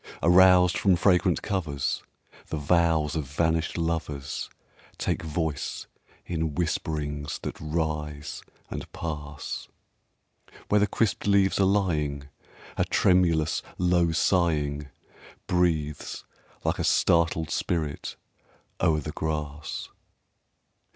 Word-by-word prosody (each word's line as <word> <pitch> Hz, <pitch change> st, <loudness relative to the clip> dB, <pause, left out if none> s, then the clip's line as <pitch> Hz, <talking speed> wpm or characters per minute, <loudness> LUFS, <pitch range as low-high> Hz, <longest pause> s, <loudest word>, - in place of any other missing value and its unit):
Aroused 90 Hz, 0 st, +6 dB
from 95 Hz, -3 st, +4 dB
fragrant 90 Hz, -1 st, +3 dB
covers, 80 Hz, -9 st, -1 dB, 0.5 s
The 80 Hz, -, -3 dB
vows 80 Hz, 0 st, +2 dB
of 80 Hz, -3 st, -1 dB
vanished 80 Hz, +4 st, 0 dB
lovers 80 Hz, -4 st, -2 dB, 0.5 s
Take -, -, -1 dB
voice 80 Hz, -3 st, -3 dB, 0.4 s
in 80 Hz, -3 st, -2 dB
whisperings 75 Hz, -3 st, -2 dB
that -, -, -5 dB
rise 75 Hz, -1 st, -3 dB, 0.3 s
and -, -, -6 dB
pass; 75 Hz, -3 st, -5 dB, 1.0 s
Where 105 Hz, -, +4 dB
the 105 Hz, -, +3 dB
crisped 105 Hz, -1 st, 0 dB
leaves 100 Hz, -1 st, +3 dB
are 95 Hz, -, +5 dB
lying 75 Hz, -8 st, 0 dB, 0.5 s
A -, -, +2 dB
tremulous, 85 Hz, -4 st, +3 dB, 0.2 s
low 90 Hz, -2 st, +3 dB
sighing 75 Hz, -4 st, +1 dB, 0.6 s
Breathes 80 Hz, -5 st, 0 dB, 0.4 s
like -, -, 0 dB
a -, -, 0 dB
startled 80 Hz, -1 st, +2 dB
spirit 80 Hz, -6 st, -2 dB, 0.7 s
o'er 80 Hz, -2 st, +3 dB
the -, -, -5 dB
grass. 75 Hz, -2 st, -4 dB
80 Hz, 100 wpm, -27 LUFS, 75-90 Hz, 1.0 s, Aroused